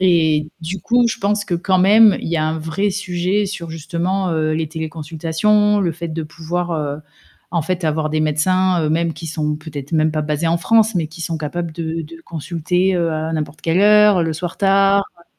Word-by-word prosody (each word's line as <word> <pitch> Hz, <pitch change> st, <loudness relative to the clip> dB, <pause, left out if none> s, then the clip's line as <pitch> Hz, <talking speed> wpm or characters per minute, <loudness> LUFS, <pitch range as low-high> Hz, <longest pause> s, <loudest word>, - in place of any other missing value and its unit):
Et 160 Hz, -4 st, +2 dB
du 170 Hz, +3 st, -5 dB
coup, 240 Hz, +1 st, +3 dB
je -, -, -3 dB
pense 205 Hz, +1 st, 0 dB
que 175 Hz, -, -2 dB
quand 185 Hz, +2 st, +1 dB
même, 210 Hz, +3 st, +6 dB
y 170 Hz, -, -2 dB
a 155 Hz, -, +1 dB
un 160 Hz, +1 st, -1 dB
vrai 160 Hz, +6 st, -1 dB
sujet 190 Hz, +1 st, -1 dB
sur 170 Hz, -4 st, -6 dB
justement, 175 Hz, +4 st, -2 dB
heu, 155 Hz, -1 st, 0 dB
les 160 Hz, 0 st, -2 dB
téléconsultations, 165 Hz, +6 st, 0 dB
le 175 Hz, -4 st, 0 dB
fait 170 Hz, +1 st, -6 dB
de 160 Hz, 0 st, -4 dB
pouvoir, 170 Hz, +2 st, -4 dB
heu, 150 Hz, -2 st, -3 dB, 0.5 s
en 170 Hz, -, +1 dB
fait, 180 Hz, +2 st, -2 dB
avoir 155 Hz, 0 st, 0 dB
des 155 Hz, 0 st, 0 dB
médecins, 180 Hz, +4 st, +1 dB
heu, 155 Hz, -, 0 dB
même 165 Hz, +1 st, +1 dB
qui 165 Hz, -1 st, -7 dB
sont 150 Hz, -1 st, -2 dB
peut-être 150 Hz, -1 st, -8 dB
même 155 Hz, 0 st, +2 dB
pas 155 Hz, 0 st, -2 dB
basés 150 Hz, +2 st, -1 dB
en 170 Hz, -, +2 dB
France, 220 Hz, +3 st, +3 dB
mais 165 Hz, -3 st, 0 dB
qui 160 Hz, +2 st, -13 dB
sont 165 Hz, 0 st, -3 dB
capables 165 Hz, +2 st, -4 dB
de 165 Hz, 0 st, -4 dB
de 165 Hz, +2 st, -11 dB
consulter, 175 Hz, +3 st, -1 dB
heu, 170 Hz, -2 st, 0 dB
à 155 Hz, +1 st, -3 dB
n'importe 155 Hz, 0 st, -4 dB
quelle 165 Hz, +2 st, +1 dB
heure, 210 Hz, -3 st, +5 dB
le 160 Hz, -, -1 dB
soir 170 Hz, +2 st, -5 dB
tard 195 Hz, 0 st, +3 dB, 0.2 s
heu -, -, -21 dB
165 Hz, 210 wpm, -19 LUFS, 155-185 Hz, 0.5 s, même